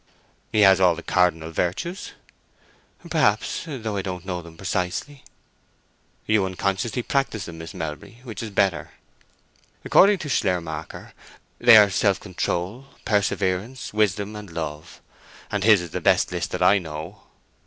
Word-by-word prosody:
"He 110 Hz, -, +2 dB
has 95 Hz, -2 st, +6 dB
all 90 Hz, -2 st, +5 dB
the 85 Hz, -, -9 dB
cardinal 80 Hz, -3 st, +1 dB
virtues." 95 Hz, -, -3 dB, 0.9 s
"Perhaps—though 125 Hz, -, -1 dB
I 100 Hz, -, -1 dB
don't 90 Hz, -2 st, -6 dB
know 90 Hz, -2 st, -3 dB
them 85 Hz, -1 st, -14 dB
precisely." 95 Hz, -, -3 dB, 1.0 s
"You 110 Hz, -2 st, +2 dB
unconsciously 95 Hz, +5 st, -2 dB
practise 125 Hz, -8 st, -1 dB
them, 80 Hz, -1 st, -9 dB
Miss 80 Hz, +1 st, -9 dB
Melbury, 80 Hz, +9 st, -7 dB
which 110 Hz, -6 st, -7 dB
is 115 Hz, -, -5 dB
better. 100 Hz, -4 st, 0 dB, 0.9 s
According 200 Hz, +1 st, +5 dB
to 160 Hz, -, -6 dB
Schleiermacher 85 Hz, -, -3 dB, 0.5 s
they 120 Hz, -2 st, +8 dB
are 105 Hz, -2 st, +6 dB
Self 100 Hz, +1 st, +2 dB
control, 95 Hz, +5 st, -3 dB, 0.2 s
Perseverance, 100 Hz, +3 st, -1 dB
Wisdom, 105 Hz, 0 st, 0 dB
and 105 Hz, -2 st, -9 dB
Love; 80 Hz, -2 st, -6 dB, 0.5 s
and 105 Hz, -1 st, -1 dB
his 105 Hz, -3 st, +6 dB
is 85 Hz, -3 st, -8 dB
the -, -, -4 dB
best -, -, +3 dB
list 85 Hz, -1 st, -3 dB
that 90 Hz, -, -2 dB
I 100 Hz, +2 st, +5 dB
know." 80 Hz, +3 st, -8 dB
95 Hz, 140 wpm, -23 LUFS, 90-110 Hz, 1.0 s, they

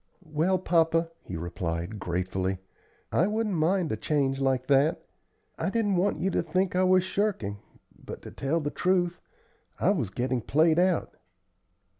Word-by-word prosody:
"Well, 160 Hz, +5 st, +1 dB
papa," 165 Hz, -2 st, +2 dB
he 90 Hz, -, -6 dB
replied, 85 Hz, +3 st, -4 dB
gratefully, 95 Hz, +1 st, -2 dB, 0.5 s
"I 175 Hz, -, +3 dB
wouldn't 215 Hz, 0 st, -1 dB
mind 170 Hz, +1 st, +1 dB
a -, -, 0 dB
change 135 Hz, -3 st, 0 dB
like 130 Hz, -1 st, +1 dB
that. 140 Hz, +3 st, +2 dB, 0.5 s
I -, -, 0 dB
didn't 205 Hz, -2 st, +1 dB
want 185 Hz, +3 st, +1 dB
you 190 Hz, -, 0 dB
to -, -, +1 dB
think 185 Hz, +3 st, 0 dB
I 185 Hz, -, +3 dB
was 185 Hz, 0 st, +4 dB
shirking, 185 Hz, -, -1 dB, 0.4 s
but, -, -, -8 dB
to -, -, -9 dB
tell 145 Hz, +5 st, -1 dB
the 145 Hz, -2 st, -3 dB
truth, 175 Hz, -1 st, 0 dB, 0.6 s
I -, -, +3 dB
was 140 Hz, -, -1 dB
getting 125 Hz, +4 st, -1 dB
played 155 Hz, +7 st, +3 dB
out." 180 Hz, -1 st, +1 dB
160 Hz, 155 wpm, -28 LUFS, 125-185 Hz, 0.6 s, was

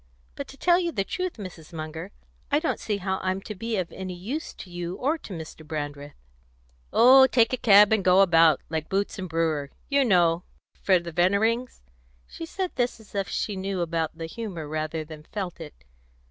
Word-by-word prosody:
"But -, -, -6 dB
to 275 Hz, -, -13 dB
tell 350 Hz, +3 st, +4 dB
you 345 Hz, -2 st, -1 dB
the 200 Hz, -10 st, -1 dB
truth, 365 Hz, -, -3 dB
Mrs. 185 Hz, -7 st, -10 dB
Munger, 160 Hz, +3 st, -6 dB, 0.4 s
I 285 Hz, -, +4 dB
don't 320 Hz, +2 st, -1 dB
see 210 Hz, -2 st, -2 dB
how 190 Hz, 0 st, -2 dB
I'm 185 Hz, 0 st, -1 dB
to 215 Hz, -, -7 dB
be 225 Hz, +2 st, -3 dB
of 180 Hz, -3 st, -2 dB
any 185 Hz, -1 st, -6 dB
use 245 Hz, -, -5 dB
to -, -, -10 dB
you 175 Hz, 0 st, -4 dB
or 295 Hz, +9 st, 0 dB
to -, -, -11 dB
Mr. 160 Hz, -2 st, -8 dB
Brandreth." 145 Hz, -2 st, -6 dB, 0.8 s
"Oh, 265 Hz, +2 st, +8 dB
take 235 Hz, -2 st, +3 dB
a -, -, +4 dB
cab 210 Hz, -2 st, +6 dB
and 215 Hz, -3 st, +2 dB
go 185 Hz, +1 st, +6 dB
about, 165 Hz, -5 st, +5 dB
like 160 Hz, -1 st, -3 dB
Boots 200 Hz, +1 st, -1 dB
and 185 Hz, -1 st, -5 dB
Brewer, 160 Hz, -3 st, 0 dB, 0.2 s
you 280 Hz, -1 st, +3 dB
know, 175 Hz, -7 st, +3 dB, 0.4 s
for 190 Hz, -2 st, +4 dB
the 170 Hz, -1 st, -6 dB
Veneerings." 210 Hz, +8 st, +1 dB, 0.4 s
She 330 Hz, -, -8 dB
said 375 Hz, +1 st, -3 dB
this 245 Hz, -2 st, 0 dB
as 220 Hz, -, -18 dB
if 195 Hz, -2 st, -2 dB
she 210 Hz, -, -2 dB
knew 190 Hz, -1 st, -3 dB
about 165 Hz, -1 st, -2 dB
the 165 Hz, -, -5 dB
humour 175 Hz, -4 st, -6 dB
rather 155 Hz, +1 st, -3 dB
than 155 Hz, -1 st, -10 dB
felt 185 Hz, +2 st, -6 dB
it. -, -, -11 dB
190 Hz, 200 wpm, -26 LUFS, 165-225 Hz, 0.8 s, Oh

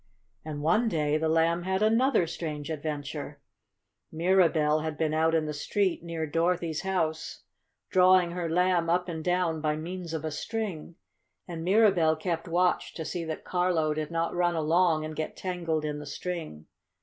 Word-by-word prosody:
And 150 Hz, -2 st, -5 dB
one 215 Hz, +9 st, +3 dB
day 150 Hz, -4 st, +1 dB
the 160 Hz, 0 st, 0 dB
Lamb 165 Hz, +2 st, +2 dB
had 190 Hz, +3 st, 0 dB
another 225 Hz, -2 st, +3 dB
strange 155 Hz, -2 st, -5 dB
adventure. 150 Hz, -2 st, -5 dB, 0.7 s
Mirabell 165 Hz, -3 st, +3 dB
had 155 Hz, -1 st, -4 dB
been 155 Hz, -1 st, 0 dB
out 160 Hz, +1 st, +2 dB
in 160 Hz, -1 st, +1 dB
the 150 Hz, -, -3 dB
street 185 Hz, +5 st, 0 dB
near 165 Hz, -1 st, -4 dB
Dorothy's 165 Hz, 0 st, 0 dB
house 160 Hz, -4 st, -2 dB, 0.5 s
drawing 185 Hz, -1 st, +5 dB
her 175 Hz, -1 st, -3 dB
Lamb 175 Hz, 0 st, +2 dB
up 180 Hz, +1 st, +1 dB
and 160 Hz, -2 st, -5 dB
down 175 Hz, -3 st, 0 dB
by 150 Hz, -1 st, 0 dB
means 170 Hz, +2 st, -6 dB
of 160 Hz, 0 st, -4 dB
a 155 Hz, -, -2 dB
string. 190 Hz, -2 st, -4 dB, 0.5 s
And 165 Hz, -2 st, -6 dB
Mirabell 185 Hz, -5 st, +4 dB
kept 165 Hz, +1 st, -3 dB
watch 175 Hz, +2 st, +1 dB
to 160 Hz, -, -5 dB
see 175 Hz, +1 st, -3 dB
that 160 Hz, -1 st, -5 dB
Carlo 175 Hz, -4 st, +1 dB
did 155 Hz, 0 st, -3 dB
not 165 Hz, 0 st, -1 dB
run 175 Hz, -1 st, +1 dB
along 160 Hz, 0 st, +2 dB
and 155 Hz, 0 st, -6 dB
get 155 Hz, -, -4 dB
tangled 170 Hz, -4 st, -2 dB
in 150 Hz, -1 st, -3 dB
the 150 Hz, -, -8 dB
string. 155 Hz, -, -5 dB
165 Hz, 170 wpm, -28 LUFS, 155-180 Hz, 0.7 s, drawing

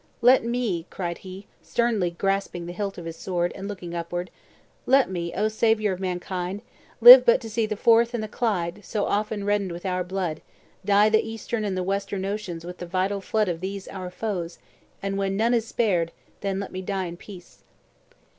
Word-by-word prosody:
Let 250 Hz, +1 st, +6 dB
me," 230 Hz, -8 st, -2 dB
cried 170 Hz, -2 st, -4 dB
he, 190 Hz, +1 st, -10 dB, 0.2 s
sternly 230 Hz, -7 st, 0 dB
grasping 195 Hz, 0 st, -2 dB
the 175 Hz, -, -6 dB
hilt 200 Hz, +1 st, -4 dB
of 175 Hz, -, -7 dB
his 165 Hz, 0 st, -6 dB
sword, 175 Hz, -1 st, -1 dB
and 195 Hz, 0 st, -7 dB
looking 185 Hz, -4 st, -7 dB
upward, 175 Hz, +1 st, -4 dB, 0.6 s
"let 265 Hz, -5 st, +4 dB
me, 170 Hz, -2 st, -3 dB
oh, 210 Hz, +3 st, +1 dB
Saviour 215 Hz, -2 st, +2 dB
of 185 Hz, -, -7 dB
mankind, 185 Hz, +1 st, -3 dB, 0.4 s
live 250 Hz, +2 st, +12 dB
but 235 Hz, -, +5 dB
to 225 Hz, -, -7 dB
see 225 Hz, 0 st, 0 dB
the 215 Hz, -, -2 dB
Forth 230 Hz, +2 st, +4 dB
and 225 Hz, -, -2 dB
the -, -, -4 dB
Clyde, 205 Hz, -4 st, -2 dB
so 205 Hz, +2 st, -2 dB
often 210 Hz, 0 st, -1 dB
reddened 205 Hz, -2 st, 0 dB
with 175 Hz, +2 st, -8 dB
our 180 Hz, -1 st, 0 dB
blood, 180 Hz, -4 st, -3 dB, 0.4 s
dye 205 Hz, +2 st, +4 dB
the 220 Hz, 0 st, +4 dB
eastern 225 Hz, 0 st, -4 dB
and 195 Hz, -3 st, -2 dB
the 185 Hz, -, -1 dB
western 195 Hz, 0 st, -2 dB
oceans 195 Hz, -5 st, -4 dB
with 180 Hz, +1 st, -8 dB
the 175 Hz, -, -6 dB
vital 190 Hz, +3 st, -1 dB
flood 215 Hz, +1 st, 0 dB
of 170 Hz, -2 st, -3 dB
these 195 Hz, +1 st, -5 dB
our 185 Hz, -2 st, -6 dB
foes; 180 Hz, -4 st, -4 dB, 0.5 s
and 195 Hz, 0 st, -2 dB
when 195 Hz, 0 st, -1 dB
none 230 Hz, +3 st, +2 dB
is 230 Hz, -1 st, +1 dB
spared, 180 Hz, -9 st, +1 dB, 0.3 s
then 195 Hz, -1 st, -2 dB
let 200 Hz, -, -5 dB
me 185 Hz, -, -5 dB
die 190 Hz, 0 st, -2 dB
in 170 Hz, 0 st, -6 dB
peace." 180 Hz, 0 st, -13 dB
195 Hz, 200 wpm, -25 LUFS, 180-215 Hz, 0.6 s, live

